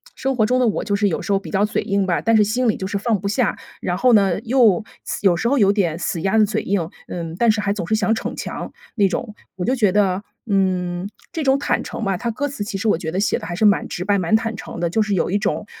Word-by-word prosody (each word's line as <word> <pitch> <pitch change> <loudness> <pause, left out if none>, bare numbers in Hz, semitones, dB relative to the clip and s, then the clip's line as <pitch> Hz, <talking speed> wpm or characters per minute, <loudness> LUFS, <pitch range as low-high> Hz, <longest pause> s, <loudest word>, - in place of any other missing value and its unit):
生 270 0 -1
活 220 - +3
中 250 +3 +2
的 250 - +3
我 215 - 0
就 200 - 0
是 205 0 +2
有 180 - -1
时 - - -3
候 195 - +3
比 - - -10
较 200 +1 +2
嘴 210 - -1
硬 200 -2 0
吧， 180 -2 0
但 225 0 +3
是 210 - +5
心 240 +5 0
里 220 - +1
就 190 - -4
是 200 0 -2
放 215 0 0
不 200 - -4
下。 215 +2 0 0.2
然 175 0 -1
后 250 +4 +4
呢， 195 -4 +4
又 225 -5 +3 0.2
死 - - -4
有 180 -3 +5
时 235 - 0
候 280 - +2
有 200 -5 +5
点 175 -6 0
死 175 -1 -3
鸭 195 +5 +1
子 215 - +6
嘴 205 -1 -1
硬， 185 -5 -1 0.2
嗯， 165 -2 -5
但 235 -2 +4
是 215 -1 -1
还 200 -1 0
总 180 -5 -4
是 220 - +2
想 220 +1 +2
逞 - - -4
强， - - -5 0.2
那 205 -4 +4
种。 210 +3 -4 0.2
我 180 -1 -3
就 255 - +1
觉 210 -6 +3
得， 195 -1 +2 0.3
嗯， 185 -2 0 0.2
这 325 -3 -3
种 270 0 +3
坦 - - 0
诚 - - -6
吧， 195 -3 0
它 235 +6 -3
歌 285 +6 -2
词 275 -7 -5
其 205 -1 -4
实 220 +3 -2
我 205 - +3
觉 160 -2 -4
得 185 - -2
写 205 - +1
得 165 - -7
还 175 - -4
是 215 - +2
蛮 205 -2 +3
直 180 - -5
白、 200 0 +2
蛮 185 +4 +2
坦 225 0 0
诚 200 - -8
的。 170 0 0
就 220 - +2
是 210 -1 0
有 180 - 0
一 200 - +2
种 205 +1 -1
205 Hz, 320 characters per minute, -21 LUFS, 185-225 Hz, 0.3 s, 子